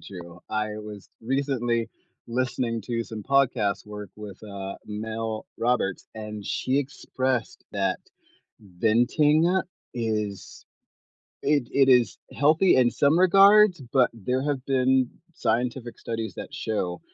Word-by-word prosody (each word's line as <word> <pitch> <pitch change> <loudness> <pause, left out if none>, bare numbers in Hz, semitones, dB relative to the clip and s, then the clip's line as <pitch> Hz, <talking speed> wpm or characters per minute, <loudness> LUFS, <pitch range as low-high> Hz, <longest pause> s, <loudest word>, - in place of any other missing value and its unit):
true. 85 -2 -10
I 110 0 -1
was 105 -2 -9
recently 120 -2 0 0.4
listening 120 -1 -1
to 115 +1 -2
some 110 -2 -7
podcast 115 -7 +1
work 105 -2 -8
with, 105 -2 -10
uh, 100 -2 -6
Mel 110 +1 -4
Roberts, 115 -6 0
and 105 -1 -7
she 130 +7 0
expressed 130 -3 -2
that - - 0 0.6
venting 140 - +2 0.3
is 105 -4 -3 0.8
it 140 -4 +1
it 135 -1 +4
is 125 -2 +4 0.2
healthy 155 +6 +4
in 125 -2 +4
some 145 +6 +3
regards, 195 0 +6
but 130 -2 +4
there 125 +4 -2
have 140 -3 -2
been 130 -1 +3 0.3
scientific 120 -1 -2
studies 115 -1 -4
that - - -8
show 95 -5 -3
120 Hz, 120 wpm, -26 LUFS, 105-135 Hz, 0.8 s, regards